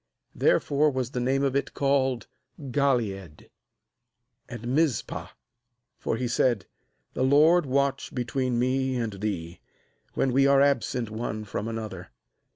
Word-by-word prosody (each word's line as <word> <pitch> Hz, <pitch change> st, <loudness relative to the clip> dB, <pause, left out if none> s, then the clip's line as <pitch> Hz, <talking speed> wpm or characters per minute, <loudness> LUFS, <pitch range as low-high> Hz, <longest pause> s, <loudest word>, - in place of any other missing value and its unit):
Therefore 145 Hz, +2 st, +2 dB
was 130 Hz, -3 st, -3 dB
the 125 Hz, -, -2 dB
name 135 Hz, +3 st, +1 dB
of 135 Hz, -1 st, 0 dB
it 140 Hz, -, -1 dB
called 135 Hz, -4 st, +1 dB, 0.3 s
Galeed; 120 Hz, -, -1 dB, 1.0 s
49and -, -, -7 dB
°Mizpah, 150 Hz, -5 st, 0 dB, 0.7 s
for 115 Hz, -, -2 dB
he 125 Hz, +1 st, -1 dB
said: 120 Hz, -4 st, +1 dB, 0.5 s
'The -, -, -1 dB
LORD 150 Hz, +4 st, +5 dB
watch 140 Hz, +1 st, 0 dB
between 125 Hz, 0 st, -1 dB
me 130 Hz, +1 st, +1 dB
and 115 Hz, -4 st, -2 dB
thee, 85 Hz, -6 st, -4 dB, 0.6 s
when 135 Hz, -, +1 dB
we 135 Hz, +1 st, +4 dB
are 140 Hz, 0 st, +5 dB
absent 125 Hz, -4 st, +1 dB
one 110 Hz, -1 st, -4 dB
from 105 Hz, +1 st, -4 dB
another. 110 Hz, -5 st, -6 dB
130 Hz, 130 wpm, -26 LUFS, 115-140 Hz, 1.0 s, LORD